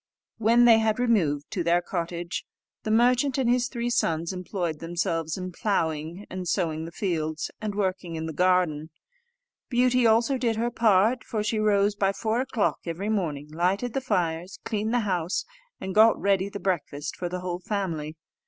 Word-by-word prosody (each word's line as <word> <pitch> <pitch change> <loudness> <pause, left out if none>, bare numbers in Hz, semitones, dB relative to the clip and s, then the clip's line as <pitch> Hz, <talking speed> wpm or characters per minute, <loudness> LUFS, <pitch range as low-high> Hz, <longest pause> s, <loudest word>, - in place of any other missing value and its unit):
When 230 +2 +5
they 230 -2 +7
had 220 -1 +1
removed 180 -13 +1
to 185 -5 -1
their 170 +1 +3
cottage, 170 -1 -4 0.4
the - - -4
merchant 250 +5 +3
and 265 -3 +1
his 245 0 +2
three 240 -1 -3
sons 165 -4 0
employed 180 -3 -3
themselves 165 -1 -2
in 185 0 -5
ploughing 165 -1 -2
and 185 -1 -6
sowing 160 -3 -1
the 165 - -8
fields, 160 -4 -2
and 210 -2 -3
working 185 -4 -2
in 160 0 -4
the 160 - -5
garden. 175 -3 +2 0.8
Beauty 250 -1 +3
also 235 +4 +3
did 235 -2 +1
her 235 +2 -1
part, 225 +2 +3
for 215 -4 -3
she 215 +1 0
rose 205 -1 +2
by 195 -1 +1
four 225 +3 -1
o'clock 250 -5 0
every 180 +5 -3
morning, 155 -9 -2
lighted 190 +9 0
the 270 - -1
fires, 175 -6 -1
cleaned 215 0 -1
the 245 0 +2
house, 180 -4 -1 0.3
and 190 - -5
got 220 +2 +6
ready 195 -1 +1
the 200 - -6
breakfast 155 -6 -2
for 175 - -4
the 180 +1 -4
whole 180 -1 -3
family. 170 -6 -3
190 Hz, 175 wpm, -26 LUFS, 170-225 Hz, 0.8 s, they